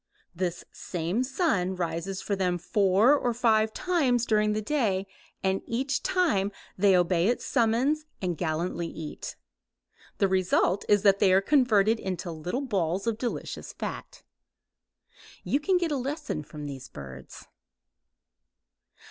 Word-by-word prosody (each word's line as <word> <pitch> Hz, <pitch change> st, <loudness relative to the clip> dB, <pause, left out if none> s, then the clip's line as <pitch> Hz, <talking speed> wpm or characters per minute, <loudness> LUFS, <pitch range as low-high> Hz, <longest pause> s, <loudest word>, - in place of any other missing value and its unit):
This 175 Hz, 0 st, -3 dB
same 180 Hz, +7 st, -2 dB
sun 240 Hz, -, 0 dB
rises 175 Hz, +2 st, -3 dB
for 200 Hz, -, -1 dB
them 180 Hz, -2 st, 0 dB
four 200 Hz, -, +3 dB
or 245 Hz, -4 st, -1 dB
five 220 Hz, -2 st, +3 dB
times 275 Hz, -8 st, +1 dB
during 210 Hz, -1 st, +2 dB
the 215 Hz, -, -1 dB
day 210 Hz, -8 st, 0 dB, 0.4 s
and 190 Hz, 0 st, +1 dB
each 265 Hz, +4 st, -1 dB
time 335 Hz, -, +1 dB, 0.2 s
they 190 Hz, -1 st, +4 dB
obey 175 Hz, 0 st, +2 dB
its 240 Hz, -, 0 dB
summons 260 Hz, +5 st, +1 dB
and 180 Hz, -2 st, -2 dB
gallantly 170 Hz, +1 st, -2 dB
eat. 160 Hz, -2 st, -7 dB, 0.8 s
The 195 Hz, -, +3 dB
result 185 Hz, 0 st, +1 dB
is 205 Hz, -1 st, +4 dB
that 200 Hz, -1 st, +5 dB
they 195 Hz, -3 st, +4 dB
are 190 Hz, -, +6 dB
converted 225 Hz, -3 st, +3 dB
into 180 Hz, -2 st, -4 dB
little 175 Hz, -, -3 dB
balls 190 Hz, -4 st, -1 dB
of 230 Hz, -1 st, -1 dB
delicious 240 Hz, -1 st, -4 dB
fat. -, -, -7 dB, 1.2 s
You 280 Hz, -, +1 dB
can 365 Hz, +5 st, +2 dB
get 345 Hz, -3 st, -1 dB
a 290 Hz, -, +1 dB
lesson 275 Hz, -, -3 dB
from 150 Hz, 0 st, -9 dB
these 135 Hz, -2 st, -7 dB
birds. 65 Hz, -2 st, -10 dB
200 Hz, 140 wpm, -27 LUFS, 180-245 Hz, 1.2 s, are